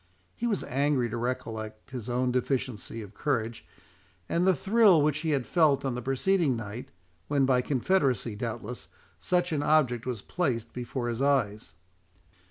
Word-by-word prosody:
He 240 Hz, -, -2 dB
was 210 Hz, -5 st, 0 dB
angry 135 Hz, -3 st, 0 dB
to 120 Hz, -, -2 dB
recollect 115 Hz, -3 st, -4 dB
his 125 Hz, -2 st, -6 dB
own 125 Hz, +1 st, +1 dB
deficiency 125 Hz, -3 st, -2 dB
of 100 Hz, 0 st, -12 dB
courage, 115 Hz, -4 st, -2 dB, 0.6 s
and 175 Hz, +2 st, +1 dB
the 190 Hz, -, +5 dB
thrill 200 Hz, -, +5 dB
which 150 Hz, 0 st, +2 dB
he 155 Hz, -2 st, +1 dB
felt 140 Hz, +1 st, +2 dB
on 135 Hz, -, 0 dB
the 125 Hz, -, -4 dB
preceding 135 Hz, +3 st, +1 dB
night, 115 Hz, +1 st, -6 dB, 0.4 s
when 140 Hz, -2 st, +2 dB
by 130 Hz, -1 st, +3 dB
confederacy, 130 Hz, -, +1 dB
doubtless, 120 Hz, +2 st, -5 dB, 0.3 s
such 180 Hz, -1 st, 0 dB
an 150 Hz, -2 st, 0 dB
object 135 Hz, -6 st, +2 dB
was 120 Hz, -6 st, -3 dB
placed 120 Hz, -10 st, -2 dB
before 125 Hz, 0 st, -4 dB
his 120 Hz, +1 st, -2 dB
eyes. 110 Hz, -11 st, 0 dB
130 Hz, 155 wpm, -28 LUFS, 115-150 Hz, 0.6 s, the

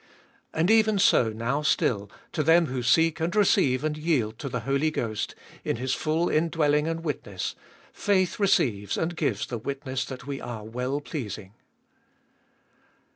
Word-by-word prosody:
And 165 Hz, +6 st, +2 dB
even 220 Hz, -2 st, +4 dB
so 155 Hz, -, +4 dB
now 115 Hz, +7 st, -1 dB
still, 105 Hz, -8 st, +1 dB, 0.2 s
to -, -, -1 dB
them 165 Hz, +3 st, +5 dB
who 130 Hz, -3 st, -3 dB
seek 160 Hz, +6 st, +3 dB
and 170 Hz, +4 st, -1 dB
receive 145 Hz, -10 st, +3 dB
and 155 Hz, -1 st, 0 dB
yield 135 Hz, -9 st, 0 dB
to 140 Hz, -, -4 dB
the 125 Hz, -1 st, -3 dB
Holy 140 Hz, +6 st, +1 dB
Ghost, 110 Hz, -8 st, -3 dB, 0.3 s
in -, -, -1 dB
His 130 Hz, +2 st, -2 dB
full 160 Hz, +3 st, 0 dB
indwelling 155 Hz, -2 st, +2 dB
and 165 Hz, 0 st, -3 dB
witness, 105 Hz, -, -3 dB, 0.4 s
faith 190 Hz, -2 st, +1 dB
receives 110 Hz, -, +2 dB
and 170 Hz, +2 st, -1 dB
gives 160 Hz, -3 st, -1 dB
the 120 Hz, -3 st, -5 dB
witness 135 Hz, +1 st, -3 dB
that 130 Hz, -2 st, -8 dB
we 140 Hz, -1 st, -5 dB
are 120 Hz, -3 st, -6 dB
well 125 Hz, +6 st, -3 dB
pleasing. 105 Hz, -, -6 dB
140 Hz, 155 wpm, -26 LUFS, 120-165 Hz, 0.4 s, them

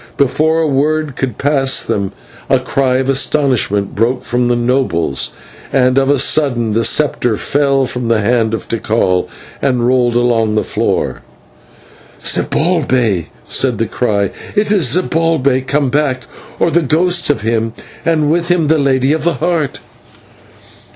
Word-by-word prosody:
Before 155 Hz, +4 st, +2 dB
a 160 Hz, -, +1 dB
word 150 Hz, +1 st, 0 dB
could 130 Hz, -5 st, -3 dB
pass 135 Hz, -2 st, +1 dB
them 100 Hz, -1 st, -2 dB, 0.4 s
a -, -, +4 dB
cry 130 Hz, -2 st, 0 dB
of 130 Hz, 0 st, 0 dB
astonishment 130 Hz, -7 st, +1 dB
broke 120 Hz, +4 st, 0 dB
from 125 Hz, 0 st, 0 dB
the 120 Hz, -, +2 dB
nobles, 120 Hz, -, 0 dB, 0.4 s
and 130 Hz, 0 st, +3 dB
of 135 Hz, 0 st, 0 dB
a 145 Hz, -, +3 dB
sudden 125 Hz, -5 st, +1 dB
the 115 Hz, +2 st, +1 dB
sceptre 125 Hz, -5 st, +1 dB
fell 140 Hz, +1 st, +1 dB
from 125 Hz, -1 st, -4 dB
the 115 Hz, -1 st, +2 dB
hand 115 Hz, +1 st, +1 dB
of -, -, -8 dB
Tikal 110 Hz, -5 st, 0 dB, 0.3 s
and 125 Hz, -3 st, +1 dB
rolled 125 Hz, -1 st, +2 dB
along 115 Hz, -3 st, +1 dB
the 110 Hz, -, +1 dB
floor. -, -, -2 dB, 1.0 s
"Zibalbay!" 130 Hz, -, 0 dB, 0.2 s
said 125 Hz, -4 st, 0 dB
the 115 Hz, -, 0 dB
cry. 100 Hz, -3 st, -1 dB, 0.2 s
"It 210 Hz, 0 st, +1 dB
is 170 Hz, -, +2 dB
Zibalbay 160 Hz, -7 st, +1 dB
come 140 Hz, -3 st, 0 dB
back, 140 Hz, -3 st, 0 dB, 0.3 s
or 170 Hz, -, +1 dB
the 170 Hz, -, +3 dB
ghost 175 Hz, +4 st, +1 dB
of 145 Hz, -, +1 dB
him, 115 Hz, 0 st, -1 dB, 0.3 s
and 155 Hz, -2 st, +1 dB
with 170 Hz, +1 st, 0 dB
him 170 Hz, -4 st, +1 dB
the 160 Hz, -1 st, +3 dB
Lady 135 Hz, 0 st, +2 dB
of 155 Hz, -1 st, -2 dB
the 170 Hz, -1 st, +1 dB
Heart!" 155 Hz, +1 st, -1 dB
130 Hz, 150 wpm, -15 LUFS, 120-150 Hz, 1.0 s, a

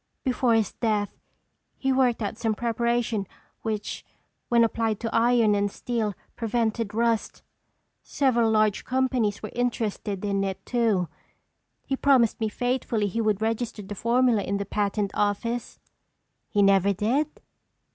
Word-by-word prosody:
Before 250 Hz, -3 st, +2 dB
his 220 Hz, -3 st, +1 dB
death 210 Hz, -3 st, -1 dB, 0.6 s
he 270 Hz, -1 st, +1 dB
worked 250 Hz, -3 st, +2 dB
out 205 Hz, -, -3 dB
some 220 Hz, -1 st, -1 dB
preparation 235 Hz, -2 st, 0 dB, 0.3 s
which 215 Hz, -2 st, -3 dB, 0.5 s
when 235 Hz, -1 st, +5 dB
applied 225 Hz, -2 st, 0 dB
to 230 Hz, -1 st, -3 dB
iron 230 Hz, -2 st, +4 dB
and 205 Hz, 0 st, +1 dB
steel 220 Hz, -4 st, -2 dB, 0.2 s
prevented 225 Hz, -2 st, -1 dB
rust—several 235 Hz, +1 st, -1 dB
large 215 Hz, -2 st, +2 dB
companies 250 Hz, -6 st, 0 dB
were 215 Hz, -, -5 dB
interested 215 Hz, -4 st, -2 dB
in 200 Hz, -1 st, 0 dB
it 195 Hz, -1 st, -4 dB
too. 225 Hz, -7 st, +1 dB, 0.8 s
He 270 Hz, -, -1 dB
promised 265 Hz, -5 st, +3 dB
me 220 Hz, -1 st, 0 dB
faithfully 245 Hz, -2 st, -1 dB
he 215 Hz, +3 st, -1 dB
would 215 Hz, -1 st, +1 dB
register 225 Hz, -1 st, -2 dB
the 200 Hz, +2 st, -7 dB
formula 235 Hz, +1 st, +2 dB
in 200 Hz, 0 st, -2 dB
the 200 Hz, -, -3 dB
patent 205 Hz, 0 st, -1 dB
office." 230 Hz, +4 st, -1 dB, 0.7 s
"He 205 Hz, -2 st, +2 dB
never 195 Hz, 0 st, +4 dB
did?" 265 Hz, +10 st, -1 dB
225 Hz, 135 wpm, -26 LUFS, 205-240 Hz, 0.8 s, when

